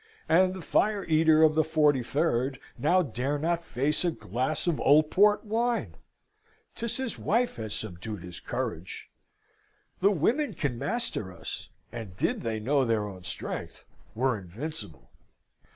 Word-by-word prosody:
And 185 +3 +4
the 185 - -7
fire 205 +2 +1
eater 160 -1 +5
of 155 -1 +6
the 155 - +4
43rd 145 -3 +1 0.2
now 175 +9 +3
dare 140 0 -2
not 170 +3 0
face 150 0 +1
a 175 - +3
glass 130 - -2
of 170 -4 0
old 150 +2 +5
port 205 +2 +4
wine! 230 +3 0 0.8
'Tis 235 0 -3
his 260 -4 -2
wife 240 +3 +1
has 110 -2 -4
subdued 105 -1 -6
his 90 -1 -8
courage. 85 +3 -5 0.9
The 195 - +5
women 230 - +1
can 130 -6 -2
master 195 - -2
us, - - -7 0.2
and 100 -6 -7
did - - 0
they 110 -2 -2
know 135 +5 +2
their 115 -4 +1
own 95 -2 -9
strength, 95 - -5 0.3
were 130 +2 +2
invincible. 105 - -8
150 Hz, 145 wpm, -28 LUFS, 115-180 Hz, 0.9 s, of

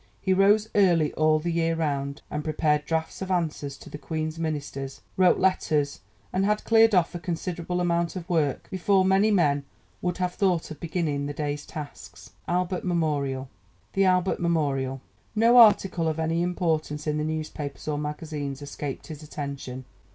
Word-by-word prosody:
He 190 - +1
rose 205 +3 +4
early 175 -7 +3
all 155 0 +3
the 170 +3 -2
year 165 0 +1
round, 140 -3 -2
and 150 0 -3
prepared 150 -1 +1
drafts 160 +2 -2
of 190 - -4
answers 155 -6 -1
to - - -14
the 150 - -8
Queen's 155 0 -4
Ministers, 145 -4 -4
wrote 185 -1 +5
letters 150 -6 +1 0.3
and 190 - +1
had 210 +1 +1
cleared 225 -2 +5
off 175 -2 +3
a 175 - -4
considerable 175 0 -3
amount 170 0 0
of 175 -2 -6
work 155 -7 0
before 190 0 +2
many 195 +3 +4
men 145 -8 +2 0.4
would 180 -1 -1
have 180 -1 -1
thought 180 -6 0
of 150 - -8
beginning 155 -4 -2
the 145 - -4
day's 145 0 -3
tasks. 150 -2 -9 0.2
[Illustration: 180 +1 -1 1.1
THE 195 0 +3
ALBERT 185 0 +3
MEMORIAL] 140 -6 0 0.3
No 230 +3 +5
article 195 -6 +5
of 160 0 -1
any 165 +1 0
importance 160 -4 -1
in 150 -1 0
the - - -1
newspapers 155 -2 -4
or 150 -1 -1
magazines 150 -2 -4
escaped 145 -1 -6
his 155 -2 -8
attention. 140 -4 -6
160 Hz, 165 wpm, -26 LUFS, 150-180 Hz, 1.1 s, wrote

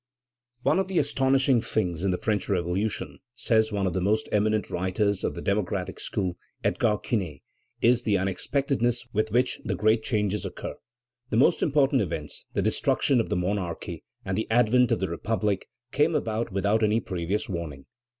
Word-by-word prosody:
"One - - +3
of 190 - 0
the 190 -2 -2
astonishing 135 -3 +3
things 90 -7 -1
in 100 - +2
the 90 - +1
French 105 +1 -1
Revolution," 95 +3 -1 0.2
says 110 -2 +2
one 100 -2 0
of 90 - 0
the 95 - -1
most 105 +4 +1
eminent 105 0 +1
writers 95 +3 0
of - - -1
the - - -6
democratic 95 -2 -1
school, 90 -4 -2 0.3
Edgar 105 -2 +2
Quinet, 90 - -3 0.4
"is 120 +1 +5
the 105 -4 +2
unexpectedness 120 +5 0
with 110 +1 +1
which 125 +4 +1
the - - -1
great 110 +1 +3
changes 105 -4 -1
occur. - - -5 0.6
The 110 - 0
most 130 - +4
important 140 -2 +3
events, 80 -6 -4
the - - 0
destruction 135 -3 +2
of 115 - -1
the - - 0
monarchy 90 -2 -3 0.2
and 95 - -1
the 110 - -2
advent 120 +1 +4
of - - +1
the 95 - +1
Republic, 100 +3 -1 0.2
came 150 +3 +2
about 110 -3 -1
without 100 +3 +1
any 110 +1 +3
previous 95 0 -2
warning." 80 -7 -5
105 Hz, 170 wpm, -26 LUFS, 95-120 Hz, 0.6 s, is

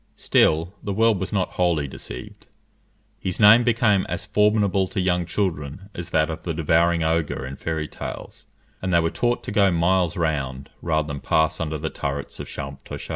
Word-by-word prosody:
Still 80 +4 +2
the 100 - -3
world 110 -1 +3
was 95 - -3
not 95 -4 0
wholly 85 -5 +2
deceived; 65 -1 -9 0.7
his 90 -2 -3
name 110 +3 +8
became 115 -5 +3
as 90 +1 -4
formidable 105 -2 +2
to 95 - -4
young 90 -2 +1
children 85 0 -3
as 90 0 -6
that 80 -2 +2
of 80 - -6
the 85 -3 -4
devouring 85 +1 +2
ogre 80 -4 0
in 65 +1 -6
fairy 80 +1 -3
tales, - - -8 0.3
and 95 - -2
they 85 - +5
were 80 0 0
taught 120 0 0
to - - -5
go 100 -2 +4
miles 85 +1 +2
round, 70 -5 -2
rather 80 -3 0
than 70 -1 -5
pass 80 +3 +1
under 80 -1 -2
the 80 +1 -4
turrets 70 0 -4
of - - -6
Champtocé. 70 -1 -8
85 Hz, 180 wpm, -23 LUFS, 80-95 Hz, 0.7 s, name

